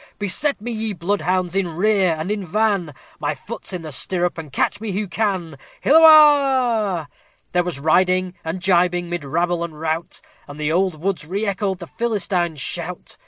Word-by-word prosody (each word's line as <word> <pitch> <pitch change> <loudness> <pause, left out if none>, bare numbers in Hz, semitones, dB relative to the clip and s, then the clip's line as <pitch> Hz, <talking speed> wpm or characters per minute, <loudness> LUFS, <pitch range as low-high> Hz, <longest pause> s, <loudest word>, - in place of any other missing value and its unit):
"Beset 245 +9 0
me, 240 +4 -5
ye 220 -1 -3
bloodhounds! 185 0 -1
in 180 -4 -1
rear 190 -2 +2
and 160 +6 -3
in 210 -2 -2
van; 195 -4 0 0.2
My 150 0 -2
foot's 205 - -8
in 180 -3 -5
the 155 - -7
stirrup 175 +5 0
and 155 -3 -9
catch 170 - -1
me 215 -3 -4
who 205 +2 -2
can!" 180 -6 -2 0.2
Hilloah! 270 - +5 0.4
There 180 0 +2
was 175 -5 -4
riding 185 +4 +2
and 160 +3 -4
gibing 175 -1 +2
mid 175 -3 -3
rabble 170 +4 -1
and 160 -3 -7
rout, 160 +1 -3 0.3
And 145 +1 -10
the 150 0 -1
old 180 -2 0
woods 170 -3 -2
re 200 +5 -2
echoed 195 -1 -1
the 175 - -8
Philistines' 185 -7 -2
shout! - - -4
180 Hz, 170 wpm, -21 LUFS, 165-205 Hz, 0.4 s, Hilloah